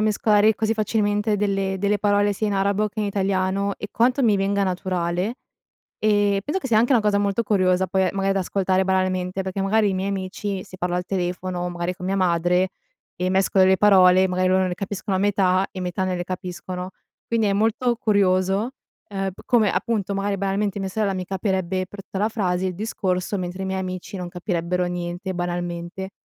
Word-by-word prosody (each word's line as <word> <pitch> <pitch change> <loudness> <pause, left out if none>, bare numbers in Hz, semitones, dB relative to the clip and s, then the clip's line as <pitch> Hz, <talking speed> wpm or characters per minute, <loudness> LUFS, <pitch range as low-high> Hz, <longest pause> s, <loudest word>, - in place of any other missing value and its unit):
mescolare, 215 0 +3
così 220 +1 0
facilmente, 210 -1 +1
delle 195 -1 0
delle 205 +1 +1
parole, 205 0 +2
sia 215 - -1
in 205 - 0
arabo, 200 +2 +1
che 210 +1 -5
in 210 - 0
italiano, 195 0 0
e 205 - -5
quanto 250 +4 +2
mi 215 -4 +4
venga 200 +1 +1
naturale, 185 +3 -1 0.6
e, 205 -2 +2
penso 345 +6 -1
che 265 - -5
sia, 220 -3 +3
anche, 240 +4 +3
una 245 - +5
cosa 205 -1 +2
molto 200 +2 +1
curiosa, 185 -3 +2
poi, 190 -1 +1
ehm, 185 - +2
maga 195 0 +1
da 195 - 0
ascoltare 190 0 +1
banalmente, 185 0 0
perché, 190 +1 -3
magari, 205 +1 +2
i - - -2
miei 190 +1 -1
amici, 195 0 -3
se - - -11
parlo 180 0 -1
al 180 0 -2
telefono, 180 -1 -2
magari, 175 +1 -3
con 180 - -7
mia 195 +1 0
madre, 180 0 +2 0.5
e 180 +1 -1
mescolo 190 0 +3
le 190 0 +4
parole, 190 -2 +6
magari 185 0 +1
loro 185 0 +3
ne 180 - -2
capiscono 195 +1 -3
a - - +1
metà, 190 -2 +2
e 185 - -7
metà 180 +1 -2
non 185 -1 -1
le 175 - -4
capiscono, 180 0 -5 0.4
quindi, 225 -2 +1
è 200 - +2
molto 225 +4 +1
curioso, 200 +1 +1 0.4
ehm, 195 0 -1
p - - -14
come, 225 -4 +3
appunto, 205 -4 -1
magari, 200 0 -1
banalmente, 200 +1 -1
mia 195 - -2
sorella, 205 0 0
mi 185 -1 -4
capirebbe 190 -1 -1
per 200 0 -10
tutta 190 - -7
la 210 +3 +1
frase 185 -4 -1
il 180 - -3
discorso, 190 -2 -2
mentre 185 +1 -4
i - - -3
miei 190 0 -2
amici, 185 +1 -5
non 180 -1 -5
capirebbero 180 0 -2
niente, 175 +2 -4
banalmente. 175 +1 -4
190 Hz, 200 wpm, -23 LUFS, 185-205 Hz, 0.6 s, parole